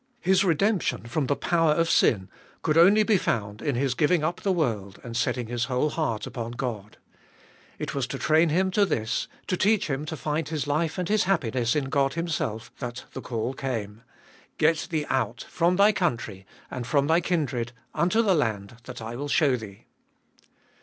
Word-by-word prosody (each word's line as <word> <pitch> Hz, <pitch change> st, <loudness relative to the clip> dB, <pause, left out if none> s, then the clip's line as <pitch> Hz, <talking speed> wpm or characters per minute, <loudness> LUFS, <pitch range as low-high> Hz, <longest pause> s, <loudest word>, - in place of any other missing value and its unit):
His 190 Hz, +1 st, +3 dB
redemption 190 Hz, -, +1 dB
from 130 Hz, +4 st, -1 dB
the 145 Hz, -, +1 dB
power 165 Hz, -1 st, +2 dB
of 165 Hz, +1 st, +1 dB
sin 95 Hz, -, +3 dB, 0.4 s
could 155 Hz, -, +1 dB
only 195 Hz, +6 st, +6 dB
be 210 Hz, -3 st, +3 dB
found 105 Hz, -6 st, -2 dB
in 145 Hz, -4 st, -1 dB
his 130 Hz, +1 st, +1 dB
giving 155 Hz, +3 st, +2 dB
up 165 Hz, +3 st, -1 dB
the 195 Hz, -, +1 dB
world 110 Hz, -, -1 dB
and 115 Hz, -1 st, -7 dB
setting 125 Hz, 0 st, 0 dB
his 120 Hz, +1 st, -2 dB
whole 130 Hz, +5 st, 0 dB
heart 120 Hz, -10 st, -2 dB
upon 120 Hz, -1 st, -5 dB
God. 115 Hz, -5 st, -5 dB, 0.8 s
It -, -, -4 dB
was 135 Hz, -3 st, -1 dB
to 135 Hz, -, -4 dB
train 160 Hz, +4 st, +3 dB
him 190 Hz, +4 st, +1 dB
to 205 Hz, +2 st, +3 dB
this, 110 Hz, -, -1 dB, 0.2 s
to 185 Hz, -, 0 dB
teach 205 Hz, -3 st, +2 dB
him 135 Hz, +3 st, -2 dB
to 160 Hz, 0 st, -5 dB
find 150 Hz, +1 st, -2 dB
his 155 Hz, -4 st, -2 dB
life 155 Hz, +2 st, -1 dB
and 180 Hz, -2 st, -2 dB
his 215 Hz, 0 st, +2 dB
happiness 130 Hz, -, +1 dB
in 150 Hz, -, +1 dB
God 135 Hz, 0 st, +1 dB
Himself, 150 Hz, -10 st, -3 dB
that 120 Hz, -1 st, -6 dB
the -, -, -6 dB
call 120 Hz, +1 st, -3 dB
came: 115 Hz, -6 st, -4 dB, 0.6 s
Get 160 Hz, +1 st, +2 dB
thee 155 Hz, -4 st, -1 dB
out 120 Hz, -3 st, -1 dB
from 175 Hz, +1 st, +1 dB
thy 200 Hz, +3 st, +6 dB
country, 120 Hz, -, -2 dB, 0.2 s
and 125 Hz, -2 st, -5 dB
from 140 Hz, 0 st, +2 dB
thy 165 Hz, +3 st, +3 dB
kindred, 140 Hz, -9 st, -1 dB, 0.2 s
unto 180 Hz, +9 st, +2 dB
the 200 Hz, -4 st, +3 dB
land 115 Hz, -, -1 dB
that 120 Hz, -3 st, -8 dB
I 115 Hz, +2 st, -5 dB
will 145 Hz, +4 st, -4 dB
show 145 Hz, -4 st, +3 dB
thee. 105 Hz, -5 st, -9 dB
145 Hz, 190 wpm, -26 LUFS, 120-170 Hz, 0.8 s, only